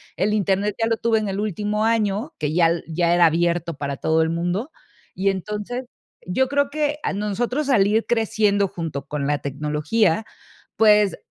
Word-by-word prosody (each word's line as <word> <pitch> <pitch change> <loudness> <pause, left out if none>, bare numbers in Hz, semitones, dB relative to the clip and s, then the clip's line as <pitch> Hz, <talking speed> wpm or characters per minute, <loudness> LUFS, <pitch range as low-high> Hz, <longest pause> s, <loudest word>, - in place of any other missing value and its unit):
El 205 +4 0
Internet 200 0 0
ya 225 - +2
lo 225 -1 0
tuve 225 -1 +1
en 210 - -3
el 195 +1 -3
último 210 +1 -1
año, 225 +4 0
que 150 0 -1
ya 170 -1 +4
l 170 0 -1
ya 170 +1 +1
era 175 -1 +5
abierto 170 0 0
para 140 -1 -4
todo 160 0 +1
el 160 - +1
mundo. 175 - -2 0.4
Y 195 +2 0
entonces, 210 +6 -4 0.4
yo 255 +9 +1
creo 285 0 +1
que, 295 0 -1
a - - -1
nosotros 240 +8 -2
al 200 -6 +4
ir 220 +2 +1
creciendo 210 -3 +1
junto 165 -6 -6
con 145 -2 -3
la 145 0 0
tecnología, 150 - 0 0.5
pues, 210 -2 +4
200 Hz, 180 wpm, -22 LUFS, 170-220 Hz, 0.5 s, era